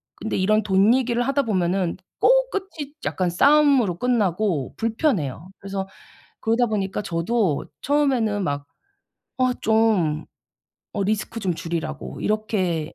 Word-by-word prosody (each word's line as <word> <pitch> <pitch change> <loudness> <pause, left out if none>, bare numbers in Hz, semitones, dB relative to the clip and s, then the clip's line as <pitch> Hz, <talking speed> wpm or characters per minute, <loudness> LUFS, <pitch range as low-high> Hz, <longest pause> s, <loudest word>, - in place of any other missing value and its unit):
근데 220 - -3
이런 215 +3 +2
돈 200 +3 +4
얘기를 245 -2 +1
하다 275 +1 +1
보면은 185 -4 0 0.2
꼭 - - +4
끝이 325 -8 -5
약간 180 -2 0
싸움으로 275 - +4
끝나고 205 - 0
불편해요. 215 - -1
그래서 195 -1 -4 0.5
그러다 230 +2 +2
보니까 210 -2 -2
저도 175 -1 0 0.2
처음에는 255 -8 +1
막 145 -2 -3 0.7
"어 255 -1 +2
좀 210 -9 +1 0.7
어 200 - 0
리스크 215 +2 -2
좀 185 -3 0
줄이라."고 70 - -5
이렇게 190 -7 -1
210 Hz, 275 characters per minute, -23 LUFS, 180-245 Hz, 0.7 s, 돈